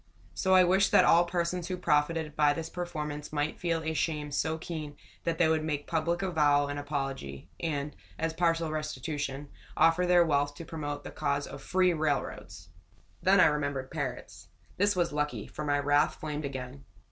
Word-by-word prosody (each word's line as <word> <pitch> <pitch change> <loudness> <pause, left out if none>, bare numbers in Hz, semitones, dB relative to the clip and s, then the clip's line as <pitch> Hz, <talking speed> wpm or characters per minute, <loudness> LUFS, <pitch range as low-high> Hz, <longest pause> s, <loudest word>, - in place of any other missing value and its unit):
So 190 -1 +2
I 185 - +8
wished 190 +2 +3
that - - +7
all 170 +1 +6
persons 175 0 -2
who 185 - -3
profited 150 -1 +1
by 150 -1 +4
this 160 +2 -5
performance 150 -4 -5
might 150 +1 -2
feel 165 -2 -1
a 160 0 -1
shame 150 -1 -2
so 160 +2 0
keen 155 -3 -6 0.3
that 165 -1 0
they 175 - +4
would 160 -1 +1
make 150 -2 -2
public 170 +3 -1
avowal 145 -5 +3
and 145 0 -3
apology, 135 - -4
and, 150 -3 -3 0.2
as 165 0 -1
partial 165 -1 +1
restitution, 145 -2 -4 0.3
offer 170 +2 +4
their 175 -1 +5
wealth 145 -2 +1
to 165 - -8
promote 145 -2 -5
the - - -8
cause 140 0 -1
of - - -9
free 185 -1 +2
railroads! 145 - -3 0.5
Then 195 +2 +5
I - - +8
remembered 145 -3 -1
parrots. 145 -6 -5 0.3
This 205 +1 +2
was 175 -4 0
lucky, 150 0 -2
for 150 - -7
my 145 -1 +2
wrath 145 +1 +2
flamed 150 -1 -4
again. 135 0 -6
155 Hz, 180 wpm, -29 LUFS, 145-170 Hz, 0.5 s, I